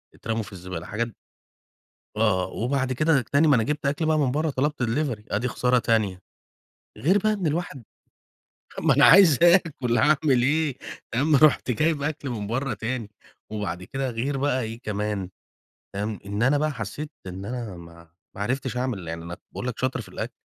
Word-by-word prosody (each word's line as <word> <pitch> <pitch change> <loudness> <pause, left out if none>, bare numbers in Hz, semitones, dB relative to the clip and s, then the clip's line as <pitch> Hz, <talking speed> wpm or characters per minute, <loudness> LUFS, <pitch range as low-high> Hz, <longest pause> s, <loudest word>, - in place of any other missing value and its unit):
اترموا 115 0 -3
في 100 - -12
الزبالة 90 -2 -7
حاجات 115 +3 -2 1.1
آه، 105 -4 +2
آه، - - -3
وبَعد 130 +2 -1
كده 150 +1 +3
ج - - -9
تاني 140 +7 +2
ما 145 - +6
أنا 115 - +2
جِبت 150 +3 -2
أكل 145 +3 0
بقي 155 0 +2
من 135 -4 +2
برّا 155 +4 0
طلَبت 140 0 -1
delivery 120 -2 -1
آدي 110 +5 0
خسارة 125 0 +2
تانية. 105 -6 0 0.8
غير 195 - +3
بقي 215 +2 +1
إن 200 -5 -2
الواحد 150 -4 -2 1.0
ما - - +3
أنا - - +7
عايز 180 -8 +7
آكل 165 -9 +4
هاعمل 145 -4 +3
إيه 150 0 +1 0.4
تمام، 145 +6 +3
رُحت 145 -3 +4
جايب 150 +4 +1
أكل 145 -2 -3
من 105 -4 -4
برّا 125 +3 -1
تاني، 110 0 -4 0.4
وبَعد 100 -5 -4
كده 135 +7 -3
غير 125 +4 -2
بقى 135 -1 +1
إيه 115 +1 -6
كمان، 105 -4 -3 0.7
تمام، 105 +1 -3
إن 100 +2 -2
أنا 135 +4 +4
بقى 155 +1 0
حسيت 125 +5 -6 0.2
إن 95 +1 -6
أنا 115 -4 -5
ما 85 0 -13 0.3
ما 100 - -3
عرفتش 125 +4 -2
أعمل 120 -9 -2
يعني 80 0 -5
أنا 85 +1 -6 0.2
باقول - - -5
لك 125 - -5
شاطر 130 0 -1
في 110 - -9
الأكل. - - -5
125 Hz, 185 wpm, -25 LUFS, 105-145 Hz, 1.1 s, أنا